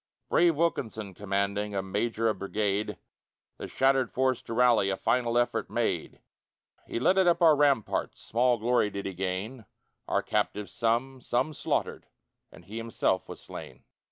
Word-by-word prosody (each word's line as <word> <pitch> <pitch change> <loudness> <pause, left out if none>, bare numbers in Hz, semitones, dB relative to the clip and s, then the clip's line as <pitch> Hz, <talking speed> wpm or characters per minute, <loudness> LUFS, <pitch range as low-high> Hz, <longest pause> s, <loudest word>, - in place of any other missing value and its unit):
Brave 170 -2 +4
Wilkinson 110 - -1
commanding, 100 +1 -2
A 95 - -1
major 110 +4 -1
of 105 -4 0
brigade, 100 +1 -1 0.6
The - - -6
shattered 135 -2 +2
force 130 -1 +1
to 115 - -7
rally 120 -5 +4
A 95 - -1
final 120 +1 +1
effort 120 -1 0
made. - - -2 0.7
He - - -3
led 185 +10 +3
it 190 - +4
up 175 0 +3
our 160 -2 +7
ramparts, 140 -6 +1
Small 120 +2 +1
glory 115 -1 +2
did 100 -1 -6
he 95 - -3
gain 95 +7 -4 0.4
Our - - 0
captives 105 -1 -1
some; 120 +3 -1
some 125 +6 0
slaughtered, - - -2 0.4
And - - -15
he 110 +3 -8
himself 115 0 -1
was - - -8
slain. - - -10
115 Hz, 155 wpm, -28 LUFS, 100-130 Hz, 0.7 s, our